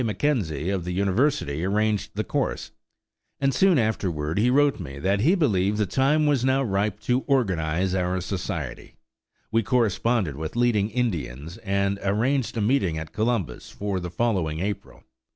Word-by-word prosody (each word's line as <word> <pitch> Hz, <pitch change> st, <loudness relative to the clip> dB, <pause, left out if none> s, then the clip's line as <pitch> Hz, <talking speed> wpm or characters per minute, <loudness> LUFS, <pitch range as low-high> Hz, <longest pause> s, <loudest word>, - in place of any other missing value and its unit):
McKenzie 105 Hz, -, -1 dB
of 95 Hz, -3 st, -2 dB
the 90 Hz, +1 st, -4 dB
university 100 Hz, -, +1 dB
arranged 105 Hz, +2 st, 0 dB
the -, -, -1 dB
course, -, -, -2 dB, 0.7 s
and 135 Hz, -1 st, +1 dB
soon 185 Hz, +5 st, +4 dB
afterward 90 Hz, -, -1 dB
he 120 Hz, +4 st, +3 dB
wrote 145 Hz, 0 st, +3 dB
me 70 Hz, -6 st, -7 dB
that 95 Hz, +7 st, +1 dB
he 160 Hz, -, +4 dB
believed 105 Hz, -, +1 dB
the 105 Hz, -, +2 dB
time 135 Hz, -, +2 dB
was 145 Hz, -4 st, +2 dB
now 135 Hz, +1 st, +2 dB
ripe 105 Hz, -2 st, -1 dB
to 125 Hz, +3 st, +1 dB
organize 95 Hz, -, +1 dB
our 90 Hz, 0 st, 0 dB
society. 90 Hz, -7 st, -5 dB, 0.6 s
We 115 Hz, +1 st, +3 dB
corresponded 115 Hz, -, +1 dB
with 80 Hz, +5 st, -5 dB
leading 120 Hz, -4 st, +2 dB
Indians 85 Hz, -, -3 dB
and 100 Hz, -2 st, -1 dB
arranged 115 Hz, +6 st, 0 dB
a -, -, 0 dB
meeting 105 Hz, -8 st, +1 dB
at 80 Hz, 0 st, -7 dB
Columbus 110 Hz, -, -1 dB
for 100 Hz, -2 st, -3 dB
the 90 Hz, 0 st, -5 dB
following 85 Hz, -6 st, -1 dB
April. 100 Hz, +2 st, -5 dB
100 Hz, 155 wpm, -25 LUFS, 90-120 Hz, 0.7 s, soon